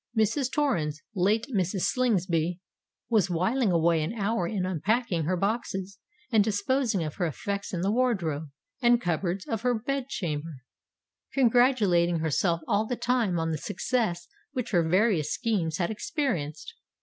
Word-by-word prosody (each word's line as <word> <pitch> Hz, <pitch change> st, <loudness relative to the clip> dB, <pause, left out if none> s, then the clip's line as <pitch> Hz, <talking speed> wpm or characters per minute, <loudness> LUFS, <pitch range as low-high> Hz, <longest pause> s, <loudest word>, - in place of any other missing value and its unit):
Mrs. 235 Hz, +5 st, +1 dB
Torrens—late 200 Hz, -, 0 dB
Mrs. 185 Hz, 0 st, 0 dB
Slingsby—was 185 Hz, -1 st, -1 dB
whiling 195 Hz, +6 st, +1 dB
away 165 Hz, -1 st, +3 dB
an 155 Hz, +8 st, -2 dB
hour 205 Hz, -4 st, 0 dB
in 190 Hz, -1 st, -2 dB
unpacking 185 Hz, -, 0 dB
her 180 Hz, +3 st, 0 dB
boxes 195 Hz, -1 st, -2 dB, 0.3 s
and 220 Hz, -3 st, +5 dB
disposing 215 Hz, 0 st, 0 dB
of 155 Hz, -1 st, -5 dB
her 180 Hz, -3 st, +1 dB
effects 200 Hz, +7 st, -4 dB
in 175 Hz, -, -2 dB
the 195 Hz, +3 st, +1 dB
wardrobe 185 Hz, -, 0 dB, 0.3 s
and 240 Hz, -1 st, +5 dB
cupboards 175 Hz, 0 st, -1 dB
of 225 Hz, -2 st, -2 dB
her 245 Hz, 0 st, +2 dB
bed 265 Hz, +3 st, -2 dB
chamber; 155 Hz, -, -4 dB, 0.7 s
congratulating 230 Hz, -9 st, +3 dB
herself 165 Hz, +2 st, +1 dB
all 210 Hz, +2 st, +1 dB
the 245 Hz, -, -1 dB
time 235 Hz, -8 st, +1 dB
on 165 Hz, 0 st, -1 dB
the 155 Hz, -, -2 dB
success 180 Hz, -, -1 dB, 0.3 s
which 250 Hz, -4 st, -3 dB
her 175 Hz, -4 st, +4 dB
various 175 Hz, -2 st, +2 dB
schemes 190 Hz, -10 st, 0 dB
had 175 Hz, +2 st, 0 dB
experienced. 215 Hz, -, -3 dB
195 Hz, 140 wpm, -27 LUFS, 170-235 Hz, 0.7 s, and